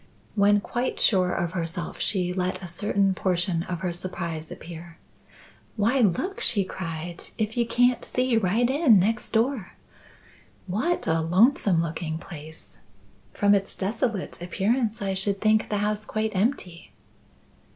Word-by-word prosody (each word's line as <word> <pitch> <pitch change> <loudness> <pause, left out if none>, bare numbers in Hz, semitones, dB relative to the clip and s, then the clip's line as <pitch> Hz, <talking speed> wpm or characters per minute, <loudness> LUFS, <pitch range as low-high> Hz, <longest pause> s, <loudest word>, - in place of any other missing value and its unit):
When 205 0 +4
quite 245 +4 -2
sure 185 -4 +4
of 175 -2 -1
herself, 170 0 -4
she 180 -3 0
let 185 0 -1
a - - -5
certain 195 +2 +1
portion 180 -2 0
of 175 -1 -5
her 180 -2 -1
surprise 170 -3 -5
appear. 170 0 -10 0.8
"Why, 230 +5 +2
look!" 285 - +1
she 200 -3 +2
cried, 170 -2 -6
"if 215 0 -1
you 235 -1 +1
can't 245 +1 +3
see 250 -1 0
right 225 +3 +2
in 265 -4 +5
next 215 +4 +1
door! 230 -1 0 0.9
What 220 - -1
a 165 0 +1
lonesome 185 - +3
looking 160 -1 -3
place! 160 -2 -11 0.5
From 205 0 +3
its 195 -1 0
desolate 210 -1 -2
appearance 210 +5 0
I 195 -1 -1
should 195 +1 -1
think 215 +1 +2
the 210 - 0
house 210 +1 -1
quite 215 0 -2
empty." 185 -5 -2
195 Hz, 140 wpm, -26 LUFS, 175-220 Hz, 0.9 s, in